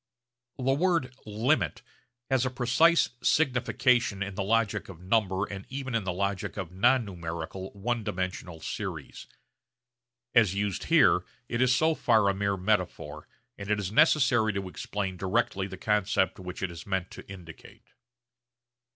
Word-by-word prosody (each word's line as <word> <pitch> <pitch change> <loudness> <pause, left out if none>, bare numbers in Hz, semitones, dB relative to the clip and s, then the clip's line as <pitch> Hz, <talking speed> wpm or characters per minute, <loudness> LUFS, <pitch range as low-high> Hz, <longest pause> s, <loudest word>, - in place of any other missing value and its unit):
The 130 - -6
word 140 -1 +1
'limit' 115 +9 0 0.5
has 130 -2 +3
a 130 - 0
precise 130 +7 +3
signification 125 -6 +2
in 100 0 -6
the 100 - -3
logic 110 +1 0
of 90 -4 -10
number 95 0 +1
and 100 -1 -7
even 135 -1 -5
in 115 -4 0
the 95 - 0
logic 100 +2 -2
of 90 -4 -5
non 120 +6 +3
numerical 85 0 -6
one 115 +3 -2
dimensional 95 -4 -4
series. - - -6 1.1
As 110 -6 +4
used 100 -2 -2
here - - +5 0.2
it 120 - -2
is 125 -1 +4
so 160 +5 +3
far 110 -8 +3
a - - +2
mere 100 0 -1
metaphor, 90 -7 -2 0.3
and 100 0 -7
it 105 0 +2
is 100 -1 -3
necessary 125 -4 +4
to 100 -1 -3
explain 95 +3 -4
directly 95 0 0
the 95 -1 -8
concept 95 -2 +1
which 90 0 -7
it 95 - -1
is 85 +2 -10
meant 95 -2 -2
to - - -11
indicate. 85 -4 -13
100 Hz, 150 wpm, -28 LUFS, 95-120 Hz, 1.1 s, here